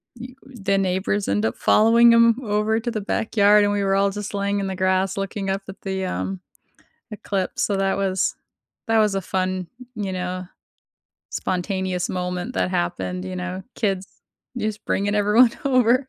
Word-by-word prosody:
you 250 +2 -10
the 200 -7 -2
neighbors 195 +2 0
end 105 +2 +1
up 110 - -1
following 230 +2 +5
him 230 0 +5
over 215 0 +1
to 240 +1 -3
the 215 -2 -3
backyard, 205 0 +3
and 205 - +2
we 200 -1 0
were 195 - +1
all 200 0 +3
just 205 +1 -6
laying 200 0 0
in 195 - -2
the 190 - -3
grass 185 +1 +1
looking 195 0 -3
up 195 +1 -2
at 195 - -10
the, 190 -1 -3
um, 190 +1 -3 0.7
eclipse, 200 -3 -3
so 200 - 0
that 195 0 +1
was 190 -2 0 0.5
that 225 0 +3
was 210 -2 +2
a 195 - 0
fun, 185 0 -2 0.3
you 195 -3 -3
know, 185 0 -4 0.8
spontaneous 185 -1 -2
moment 180 +5 -3
that - - 0
happened, 180 +1 -2
you 185 -1 -5
know, 185 +1 -4
kids 195 -3 -1 0.5
just 215 -3 -3
bringing 205 +1 0
everyone 210 +4 +5
over. 255 0 +3
195 Hz, 170 wpm, -23 LUFS, 185-215 Hz, 0.8 s, following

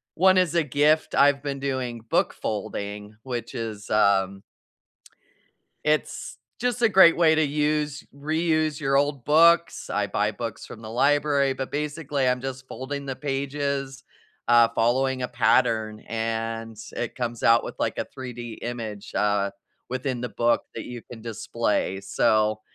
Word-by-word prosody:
one 185 +2 +5
is 180 -3 +3
a 165 - +4
gift. 150 +3 +2
I've 140 -1 +4
been 140 -2 -4
doing 130 -4 -3
book - - +2
folding 105 0 -5
which 120 -3 -5
is, 110 -2 -5
um 100 -2 +2 1.4
it's, 155 0 -1 0.2
just, 245 -1 -1
a 225 - +6
great 185 -4 +7
way 160 -2 +5
to 155 0 +3
use 150 0 0
reuse 155 +1 0
your 135 -2 +1
old 140 -2 +1
books, 170 +3 +4
I 105 -1 0
buy 105 +1 0
books 115 0 -6
from 110 -1 -11
the 110 - -7
library 140 +1 +2
but 130 0 -5
basically 145 -2 -1
I'm 125 0 +2
just 130 0 -6
folding 140 +1 -6
the 135 - -3
pages, 140 -1 -3 0.4
uh, 120 -1 +6
following 130 +2 +1
a - - -1
pattern, 110 -2 +1
and 115 0 -3 0.2
it 120 - -3
comes 120 -2 -3
out 115 0 +5
with, - - -6
like, - - -1
a - - -2
3D 120 -3 -8
image, 110 -4 -5
uh, 100 -1 +1 0.4
within 130 -1 -3
the 125 - -3
book 120 0 +1
that 115 - -5
you 120 -1 -7
can 115 -2 -9
display, 100 -3 -1
so 110 +2 +1
130 Hz, 155 wpm, -25 LUFS, 115-145 Hz, 1.4 s, great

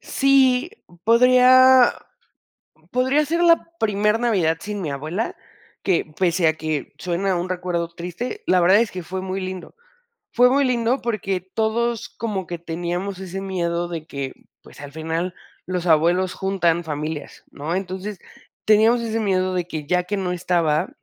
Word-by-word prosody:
Sí, 275 +2 +3 0.3
podría 255 +2 +6 1.0
podría 260 +4 +2
ser 335 +3 0
la 335 -1 +4
primer 210 0 +1
Navidad 185 -9 +1
sin 205 -1 -5
mi 155 -5 -3
abuela, 155 +10 -3 0.5
que, 185 -3 +1
pese 175 -2 +2
a 160 - +1
que 155 -2 -4
suena 185 +1 -1
un 175 +1 -3
recuerdo 180 -2 -2
triste, 185 - -6
la 180 - +4
verdad 190 +5 +5
es 235 - 0
que 180 -1 -6
fue 185 +3 -5
muy 190 +1 -3
lindo, 185 -1 -7 0.6
fue 250 0 +5
muy 275 +2 +3
lindo 245 +1 +1
porque 195 -5 -2
todos 225 +4 -2
como 200 -6 -4
que 175 0 -5
teníamos 175 +3 -4
ese 190 0 -6
miedo 175 -3 -2
de 165 -2 -6
que, 135 -1 -5 0.3
pues, - - -15
al 145 -1 -9
final 165 +3 -3 0.3
los 180 -1 -3
abuelos 175 +3 +3
juntan 175 -3 0
familias, 150 0 -5
¿no?, 155 +4 -4
entonces, 190 +1 -4 0.5
teníamos 220 +3 +4
ese 225 0 -2
miedo 185 -2 0
de 175 -1 -1
que 155 -4 -6
ya 180 +1 +1
que 205 +3 -3
no 185 -2 -2
estaba, 170 -4 0
185 Hz, 155 wpm, -22 LUFS, 170-225 Hz, 1.0 s, podría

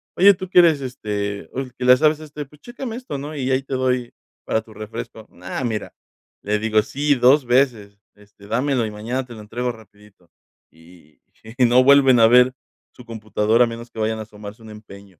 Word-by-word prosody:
:"Oye 200 +2 +6
tú 185 0 -8
que 180 - +6
eres, 160 -5 +4
este, 105 -5 -5
el 130 -3 -6
que 125 - -8
le 125 0 +7
sabe, 155 +2 +3
este, 150 -1 -9
pues, 150 +2 -22
chécame 240 -1 -7
esto, 250 - -6
¿no?, 145 +3 -7
y 135 -2 -3
ahí 130 +1 +1
te 135 - -7
doy 125 -2 -1 0.3
para 110 - -1
tu 110 -1 -17
refresco", 110 0 -8 0.2
ah, 95 +8 -4
mira, 110 -4 -4 0.5
le 105 +1 0
digo: 110 -1 +2
"Sí, 145 +5 0
2 130 +2 +4
veces, 120 -6 0 0.2
este, 105 0 -19
dámelo 125 +2 0
y 110 - -5
mañana 115 +5 -4
te 120 - -12
lo 110 - -10
entrego 120 +4 -4
rapidito" 105 -5 -19 0.4
y 80 -2 -21 0.4
y 125 - +6
no 125 +2 +5
vuelven 135 -2 +6
a 115 - +7
ver 125 +2 +5 0.4
su 125 - -15
computadora 110 0 +1
a - - -4
menos 115 +1 -9
que 110 - -10
vayan 110 +1 -1
a 110 - -5
asomarse 105 +1 -12
un 110 - -11
empeño, 100 -4 -14
120 Hz, 205 wpm, -21 LUFS, 105-135 Hz, 0.5 s, le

